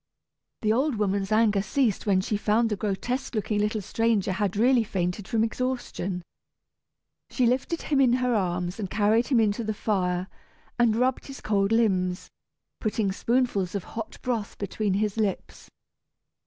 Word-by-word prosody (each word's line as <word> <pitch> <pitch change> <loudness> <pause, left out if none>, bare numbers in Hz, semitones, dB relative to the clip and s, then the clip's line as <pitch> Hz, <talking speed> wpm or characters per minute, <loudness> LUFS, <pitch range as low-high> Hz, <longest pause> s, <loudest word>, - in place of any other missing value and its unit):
The 215 0 +3
old 270 +3 +1
woman's 200 -1 -1
anger 215 -2 +3
ceased 215 +1 0
when 190 -2 +3
she 210 - -2
found 220 +2 +2
the - - +1
grotesque 230 +6 -3
looking 210 0 0
little 210 +1 0
stranger 220 -1 0
had 195 +1 -1
really 245 +2 +4
fainted 185 -1 -3
from 225 -1 +1
exhaustion. 225 -7 -3 1.1
She 255 - +1
lifted 260 +7 0
him 280 -2 +2
in 250 -3 +4
her 250 -1 +1
arms 180 -2 -1
and 195 -3 -3
carried 215 +4 +2
him 255 -5 +3
in 215 -2 +3
to 230 +3 -4
the 215 -1 -2
fire, 185 -4 -1 0.5
and 235 -2 +4
rubbed 250 +2 0
his 275 -1 -8
cold 200 -1 +1
limbs, 185 -6 +1 0.5
putting 215 -2 0
spoonfuls 210 -4 0
of 200 - -2
hot 225 -1 -7
broth 230 -5 -2
between 200 0 -1
his 210 +1 -1
lips. 210 -3 -3
215 Hz, 160 wpm, -26 LUFS, 195-235 Hz, 1.1 s, really